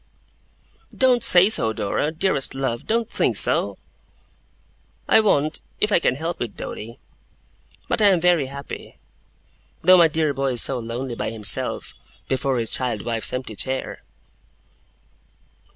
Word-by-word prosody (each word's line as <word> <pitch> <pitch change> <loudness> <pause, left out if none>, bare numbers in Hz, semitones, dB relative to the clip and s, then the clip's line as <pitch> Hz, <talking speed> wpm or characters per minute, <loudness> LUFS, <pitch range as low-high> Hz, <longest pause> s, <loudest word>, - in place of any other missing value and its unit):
'Don't 255 -3 +3
say 180 +1 +7
so, 115 - +3
Dora! 110 +8 -2
Dearest 160 -5 -1
love, 130 -3 -4
don't 230 0 0
think - - 0
so!' - - +3 1.3
'I - - +5
won't, 155 -8 0 0.2
if 210 - 0
I 200 - +4
can 130 - 0
help 165 +4 -5
it, 120 -4 -5
Doady. 115 +3 -8 0.9
But - - -1
I 210 - +5
am 190 -3 +3
very 170 -5 +2
happy; 140 +1 -10 0.9
though 185 +2 +6
my 170 - +6
dear 155 -1 -1
boy 135 -1 -2
is 120 - +6
so 130 -2 +1
lonely 120 +2 -5
by - - -4
himself, 110 -2 -1 0.3
before 135 0 -1
his 115 -2 -2
child 120 -5 0
wife's 115 -2 0
empty 125 -4 -5
chair! 130 +5 -3
135 Hz, 140 wpm, -22 LUFS, 120-175 Hz, 1.3 s, say